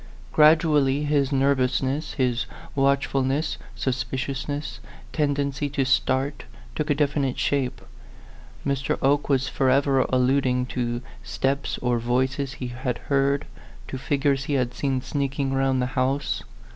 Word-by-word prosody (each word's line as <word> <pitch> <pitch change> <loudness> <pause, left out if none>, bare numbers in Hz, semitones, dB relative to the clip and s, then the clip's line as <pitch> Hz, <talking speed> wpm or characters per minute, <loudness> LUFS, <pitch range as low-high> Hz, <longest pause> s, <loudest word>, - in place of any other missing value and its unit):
Gradually 150 -3 +4
his 145 -2 +1
nervousness, 135 +1 +1
his 125 -3 0 0.3
watchful 140 0 +2
ness, 135 +4 -1 0.2
suspiciousness, 135 +3 -3 0.3
tendency 145 -2 0
to 135 -1 0
start, 135 +2 +1 0.3
took 150 - -3
a 145 - +3
definite 140 -2 0
shape. 135 -3 0 0.9
Mr. 140 -1 0
Oke 145 +2 +2
was 135 -1 +2
forever 135 +1 +2
al - - 0
luding 125 -1 +2
to 120 -1 -2 0.2
steps 135 - -1
or 120 -1 +2
voices 130 +3 0
he 125 - -5
had 125 0 -3 0.2
heard, 140 +1 +2 0.4
to 130 - -5
figures 140 0 0
he 145 - -2
had 125 -3 0
seen 130 0 -1
sneaking 140 -1 -1
round 135 -1 +2
the 125 - +1
house. 135 +1 0
135 Hz, 130 wpm, -25 LUFS, 130-140 Hz, 0.9 s, Gradually